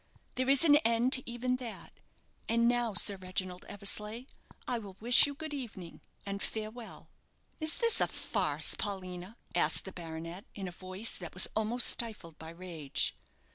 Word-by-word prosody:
There 255 +1 -1
is 280 +4 +6
an 295 -2 +7
end 245 0 +3
even 250 +1 -2
to 255 - -9
that. 230 - -9 0.6
And 235 +1 +2
now, 240 -3 0
Sir 200 -1 +4
Reginald 185 -1 -4
Eversleigh, 210 +4 -2 0.4
I 245 - -1
will 195 -3 -11
wish 240 +6 +7
you 285 - -6
good 315 +1 -7
evening, 215 - -8 0.2
and 200 0 -5
farewell." 220 +1 -7 0.5
"Is 315 0 0
this 465 -1 +3
a - - +3
farce, - - +1
Paulina?" 185 +1 -6 0.2
asked - - +2
the 190 - -6
baronet, 165 +2 -8
in 195 -2 -5
a - - -6
voice 185 +5 -5
that 175 -2 -9
was 180 - +8
almost 220 +3 +2
stifled 210 -9 +2
by 160 - -9
rage. 165 -4 -3
215 Hz, 165 wpm, -31 LUFS, 185-245 Hz, 0.6 s, was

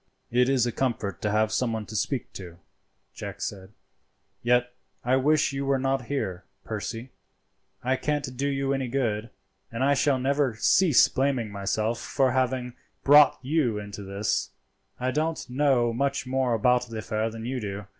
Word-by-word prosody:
"It 125 +2 +3
is 130 -3 +3
a 120 - -1
comfort 110 -7 -2
to 105 - 0
have 110 +1 +2
someone 115 -4 -1
to 110 - -9
speak 125 +4 -2
to," 85 -3 -9 0.6
Jack - - -7
said, 95 -1 -5 0.7
"yet 125 +1 +2 0.3
I 125 +1 +3
wish 145 +2 +2
you 135 0 -2
were 135 0 +3
not 135 -1 -1
here, 95 -11 -3 0.2
Percy; 115 +3 -5 0.7
I 130 +2 +1
can't 145 -3 -2
do 140 +3 -1
you 135 -1 0
any 135 -2 -1
good, 115 -3 -1 0.4
and 115 +3 -2
I 140 +1 +4
shall 140 0 +2
never 135 -1 +1
cease 160 - +5
blaming 130 -5 -1
myself 105 +3 -1
for 135 -2 +1
having 130 -1 0 0.3
brought 145 0 +7
you 130 -6 +1
into 105 -1 -7
this 100 +2 -1 0.5
scrape. 125 - -3
I - - 0
don't 160 +3 -1
know 130 -4 +2
much 140 +3 -1
more 130 -2 +1
about 125 +2 +2
the 115 -1 -7
affair 110 0 -2
than 115 0 -8
you 130 +1 -2
do. 100 -2 -5
125 Hz, 170 wpm, -26 LUFS, 110-135 Hz, 0.7 s, brought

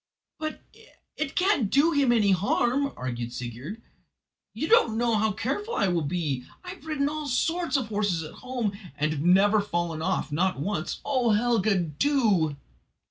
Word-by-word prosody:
"But 310 0 -5 0.5
it 280 -3 -3
can't 365 - +2
do 295 +8 +4
him 280 -5 +3
any 215 -4 +3
harm," 240 +9 +1
argued 120 -2 -4
Sigurd; 125 - -7 0.7
"you - - -3
don't 235 - +4
know 235 0 +1
how 220 0 +2
careful 290 - -3
I 195 - +2
will 175 -2 +1
be. 145 -4 -2 0.2
I 360 - -8
have 360 -4 -10
ridden 290 -3 0
all 305 0 -4
sorts 325 +3 0
of 245 -5 -3
horses 205 -6 0
at 155 - -9
home, 245 -6 -2 0.2
and 155 +1 0
have 150 -2 -3
never 195 +5 +4
fallen 175 -5 -2
off 160 - -1
not 180 +2 0
once. 175 +1 -3
Oh, 255 -5 +2
Helga, 215 -2 +2
do!" 175 - +1
210 Hz, 165 wpm, -26 LUFS, 170-275 Hz, 0.7 s, do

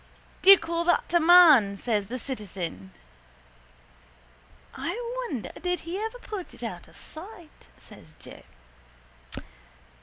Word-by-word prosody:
—Do 385 - +4
you 395 - +11
call 335 0 -3
that 350 -1 +1
a 345 - +5
man? 315 - +6
says 205 -1 -2
the 250 +4 -5
citizen. 185 - -6 1.8
—I 350 +6 -4 0.3
wonder 260 - -5
did 360 -2 -2
he 345 +4 -6
ever 445 +3 -5
put 415 -6 -8
it - - -12
out - - -7
of - - -20
sight, 345 0 -12
says - - -16
Joe. - - -13
330 Hz, 125 wpm, -26 LUFS, 220-360 Hz, 1.8 s, you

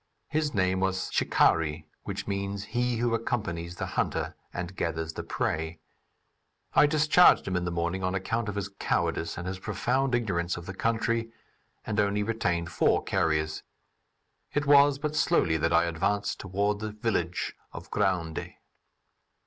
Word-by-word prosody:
His 150 0 0
name 95 -1 +2
was 95 0 -1
"Chicari," 80 -1 +2 0.2
which - - -4
means 100 0 -3
"he 120 0 +1
who 120 0 +1
accompanies 90 -7 -2
the - - -3
hunter - - -1 0.2
and 90 +1 -5
gathers 80 -1 -2
the - - -4
prey." 80 +1 -2 0.9
I 150 - +6
discharged 155 - +5
him 95 - -1
in 90 0 0
the - - -1
morning 85 +2 -1
on 90 +1 0
account 110 +3 -1
of 105 - -4
his 100 -1 -2
cowardice 90 -4 -1
and 90 +2 -5
his 95 0 -4
profound 125 +6 0
ignorance 90 -8 -1
of 85 - -8
the 95 - -6
country, 115 +2 0 0.5
and 110 0 -1
only 105 0 +2
retained 90 -6 -1
four - - +2
carriers. 80 -1 0 0.9
It 145 0 +1
was 140 -1 +6
but 150 +1 -3
slowly 150 - +3
that 80 +2 0
I 85 0 +5
advanced 100 +5 -1
toward 100 +2 -1
the 110 -1 -4
village 105 -6 -1 0.2
of - - -10
Gounde. 90 -5 -1
100 Hz, 155 wpm, -28 LUFS, 85-115 Hz, 0.9 s, I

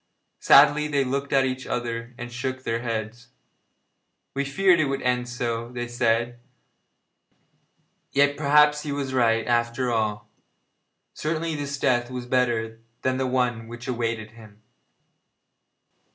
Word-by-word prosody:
Sadly 150 +1 +6
they 140 -2 +1
looked 140 +2 -3
at 135 -1 +4
each 130 0 -4
other 120 0 -4
and 120 0 -7
shook 130 +1 -4
their 115 -2 -1
heads. 115 0 -4 1.1
'We 140 +1 -1
feared 180 +4 +3
it 155 - +3
would 135 0 -3
end 125 0 0
so,' 120 -1 -3
said 120 -1 +1
they, 120 - -15 1.8
'yet, 145 +1 +3
perhaps, 150 0 +4
he 150 - -5
was 140 -2 -3
right 115 -3 +2
after 120 +1 0
all. 105 -2 -1 0.9
Certainly 160 +1 -2
this 140 -1 -4
death 120 -3 +1
was 125 -1 -5
better 120 -3 0 0.2
than 130 0 +1
the 130 0 0
one 125 -3 -1
which 120 +2 -9
awaited 115 -3 -3
him.' 110 -2 -16
125 Hz, 135 wpm, -25 LUFS, 115-140 Hz, 1.8 s, Sadly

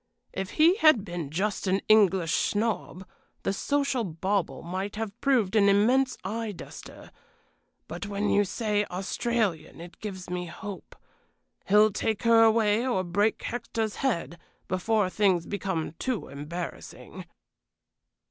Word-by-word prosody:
If 190 0 -4
he 335 +5 +5
had 310 - +5
been 175 -6 -5
just 195 +6 -2
an 190 +1 +2
English 190 -6 +4
snob, 205 -3 -1 0.4
the 195 - 0
social 280 +2 0
bauble 180 -4 -2
might 190 +4 -4
have 220 0 -5
proved 235 -8 +2
an 200 -2 +5
immense 245 +6 +3
eye 215 +2 -3
duster; - - -11 0.8
but 175 +5 -6
when 205 +1 -2
you 205 - +3
say 210 +1 -1
Australian 195 -3 -2
it 170 +1 -11
gives 190 -4 -7
me 180 0 -4
hope. 195 +3 -9 0.7
He'll 210 +2 +5
take 220 +1 -2
her 230 -1 +6
away, 220 0 +3
or 245 -8 0
break 200 +5 0
Hector's 230 -2 -3
head, 170 -10 -2 0.3
before 200 +2 +1
things 185 -3 +1
become 190 -6 -3
too 255 -5 -3
embarrassing." 155 +5 -7
205 Hz, 130 wpm, -27 LUFS, 185-225 Hz, 0.8 s, her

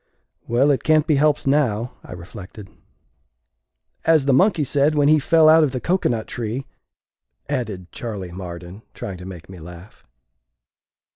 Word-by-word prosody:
"Well, 130 +5 +3
it 135 - 0
can't 155 -1 +3
be 155 -4 +2
helped 150 +1 +2
now," 125 -5 +1
I - - -10
reflected. 95 +3 -11 0.7
" - - -52
As 155 -4 +3
the 140 - +3
monkey 180 +2 +3
said 145 +2 +1
when 145 -1 +3
he 155 0 +5
fell 160 +2 +4
out 160 +1 +7
of 140 -4 0
the 130 - -2
cocoanut 120 -10 0
tree," 120 +3 -4 0.8
added 110 -10 -4
Charley 100 -7 -6
Marden, 90 +1 -8
trying 95 -3 -6
to 90 - -9
make 90 -3 -10
me 95 -2 -11
laugh. 85 +5 -13
120 Hz, 155 wpm, -21 LUFS, 95-145 Hz, 0.8 s, out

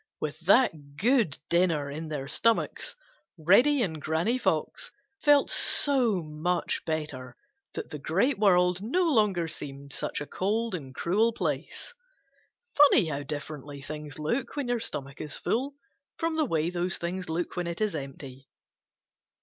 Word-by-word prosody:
With 155 0 -4
that 160 - +3
good 230 - +2
dinner 165 -5 +1
in 160 +3 -6
their 145 -3 -4
stomachs, 230 +10 +1 0.4
Reddy 240 - +4
and 160 -6 -3
Granny 170 - 0
Fox 485 - -1 0.3
felt 290 -2 +5
so 245 - +4
much 160 +3 -2
better 145 -6 -4 0.4
that - - -6
the 150 - -6
Great 195 - +1
World 180 -3 +3
no 275 - +1
longer 210 - +2
seemed 140 -3 -6
such - - -3
a 145 - -5
cold 215 +7 -1
and 135 -7 -6
cruel 215 +7 +1
place. - - -4 0.8
Funny 285 -8 +6
how 140 -1 -3
differently 145 0 -6
things 150 0 -7
look 155 - -2
when 285 -4 -2
your 245 -1 +1
stomach 140 -9 -5
is 150 -2 -4
full 270 +4 -1 0.4
from 330 0 -1
the 315 -1 +2
way 165 - 0
those 180 0 -1
same - - -9
things 180 +1 -4
look 165 +2 -3
when 180 -1 -2
it 170 0 -4
is 215 -5 0
empty. 135 -2 -8
175 Hz, 150 wpm, -28 LUFS, 150-230 Hz, 0.8 s, Funny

